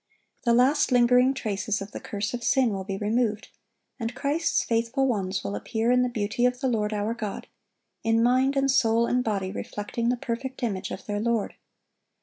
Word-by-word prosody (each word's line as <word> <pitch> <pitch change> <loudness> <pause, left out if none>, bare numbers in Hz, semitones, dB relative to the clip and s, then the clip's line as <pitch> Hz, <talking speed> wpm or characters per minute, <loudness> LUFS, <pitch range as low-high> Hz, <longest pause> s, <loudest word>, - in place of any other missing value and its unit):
The 235 - +4
last 265 +4 +3
lingering 250 +2 +4
traces 210 -2 -2
of 195 +1 -7
the - - -6
curse 205 +2 -4
of 240 -1 -4
sin 255 -1 +3
will 195 -1 -3
be 195 0 -4
removed, 215 +1 -1 0.5
and 230 0 -3
Christ's 295 +5 0
faithful 230 +4 0
ones 195 -6 -1
will 100 0 -3
appear 225 - -1
"in 250 0 +4
the 250 - +1
beauty 220 0 -2
of 250 0 -2
the 265 - 0
Lord 215 -4 0
our 210 +1 -1
God," 215 -4 -5 0.6
in 225 0 +3
mind 260 +3 +3
and 275 0 +3
soul 230 -2 +3
and 250 +1 +1
body 195 -4 -2
reflecting 215 +3 -3
the 250 - +1
perfect 255 +3 -5
image 200 -5 -2
of 190 - -7
their 205 -1 -2
Lord. 230 -1 0
230 Hz, 190 wpm, -26 LUFS, 210-250 Hz, 0.6 s, The